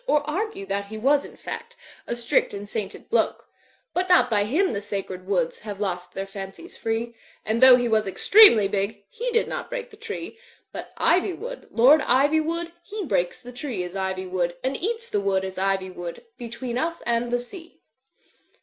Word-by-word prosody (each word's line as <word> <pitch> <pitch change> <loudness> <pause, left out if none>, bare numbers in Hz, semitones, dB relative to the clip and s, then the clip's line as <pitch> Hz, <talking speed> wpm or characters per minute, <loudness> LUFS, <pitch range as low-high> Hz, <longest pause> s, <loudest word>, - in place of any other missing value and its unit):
Or 300 -8 +2
argue 360 - -3
that 200 +1 -2
he 220 +2 -7
was 280 +6 +3
in - - -12
fact 475 +1 -7 0.3
A 235 - -2
strict 235 -3 +1
and 200 +1 -7
sainted 205 -2 -5
bloke; 475 - 0 0.5
But 365 +1 0
not 360 -8 +5
by 205 -2 +3
him 320 - +1
the 200 - -2
sacred 195 -3 -5
woods 180 -5 0
Have 205 -2 -7
lost 180 -3 -3
their 195 - -4
fancies 195 - -8
free, 225 +1 -2 0.3
And 220 +2 0
though 260 -1 +10
he 245 -1 +1
was 215 -2 +2
extremely 230 - +7
big. 200 +1 -2
He - - -3
did 460 -1 +2
not - - -5
break - - -5
the 425 - -14
tree. 450 0 -7 0.3
But - - -8
Ivywood, 395 +8 0
Lord 270 +7 +6
Ivywood, 315 +6 +2
He 415 +2 -6
breaks 180 - -1
the 245 - -9
tree 245 -7 -4
as 180 +1 -7
ivy 190 -1 -2
would 180 -2 -1
Aad 265 +1 0
eats 460 +4 -2
the 205 - -1
woods 190 -1 +1
as 190 0 -6
ivy 190 -1 0
would 175 - -7
Between 240 0 -5
us 335 +3 -2
and 235 0 0
the 245 - +1
sea. 330 +8 -10
235 Hz, 190 wpm, -24 LUFS, -, 0.5 s, though